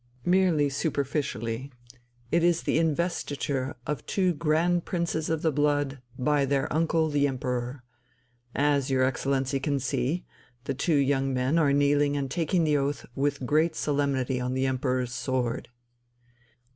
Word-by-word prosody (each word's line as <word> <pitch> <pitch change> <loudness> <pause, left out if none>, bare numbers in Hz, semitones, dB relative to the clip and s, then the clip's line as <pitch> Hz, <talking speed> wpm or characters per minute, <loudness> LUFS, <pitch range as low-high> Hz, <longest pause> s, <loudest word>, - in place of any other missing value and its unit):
"Merely 175 -5 +3
superficially. 140 -4 -2 0.6
It 170 0 +3
is 175 -1 +3
the - - +1
investiture 145 -4 -1
of 150 - -3
two 185 -3 +1
Grand 170 +3 +1
princes 170 -3 -2
of 160 -1 -1
the 160 - +3
blood 145 -2 0 0.2
by 145 +2 +2
their 135 0 +1
uncle, 160 0 +2
the 145 -1 +3
Emperor. 125 -1 -3 0.7
As 145 -1 +2
your 130 -1 +2
Excellency 135 +1 0
can 140 +1 0
see, 135 +5 -1 0.4
the 135 - -2
two 150 +4 +1
young 135 -1 +2
men 130 +6 +2
are 145 -3 +3
kneeling 145 0 +3
and 135 -2 -3
taking 170 +1 +1
the 150 -2 +3
oath 140 +1 -2
with 140 0 -1
great 155 +4 +2
solemnity 140 -4 0
on 125 +1 -2
the 130 0 +1
Emperor's 130 -1 -1
sword." 125 -1 -2
145 Hz, 145 wpm, -27 LUFS, 130-155 Hz, 0.7 s, Merely